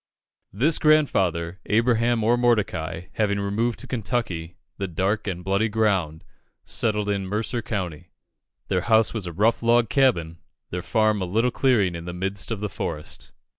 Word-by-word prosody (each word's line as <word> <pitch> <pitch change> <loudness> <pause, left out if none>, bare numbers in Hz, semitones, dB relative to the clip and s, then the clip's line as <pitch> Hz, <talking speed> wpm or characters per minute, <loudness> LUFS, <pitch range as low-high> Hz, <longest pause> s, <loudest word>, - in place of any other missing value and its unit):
This 140 - +2
grandfather, 95 - +2
Abraham 115 +1 +2
or 115 +2 +4
Mordecai, 95 -8 0
having 100 -2 0
removed 110 +4 -1
to - - -6
Kentucky, 105 -9 -3 0.2
"the 100 - -1
dark 95 +5 -1
and 90 -2 -3
bloody 100 +4 +1
ground," 95 -8 0 0.4
settled 105 -2 0
in 100 -2 -1
Mercer 110 +4 -2
County. 90 -6 -4 0.6
Their 90 - +1
house 110 +3 +3
was 105 -6 -4
a - - -4
rough 105 +7 +2
log 120 -1 +3
cabin, 85 - +2 0.3
their 90 - -3
farm 110 0 +1
a - - 0
little 115 +7 +1
clearing 115 -9 +2
in 85 0 -7
the 90 - -5
midst 95 +2 -2
of 110 -3 -3
the 105 - -1
forest. 75 -5 -5
105 Hz, 160 wpm, -24 LUFS, 90-115 Hz, 0.6 s, or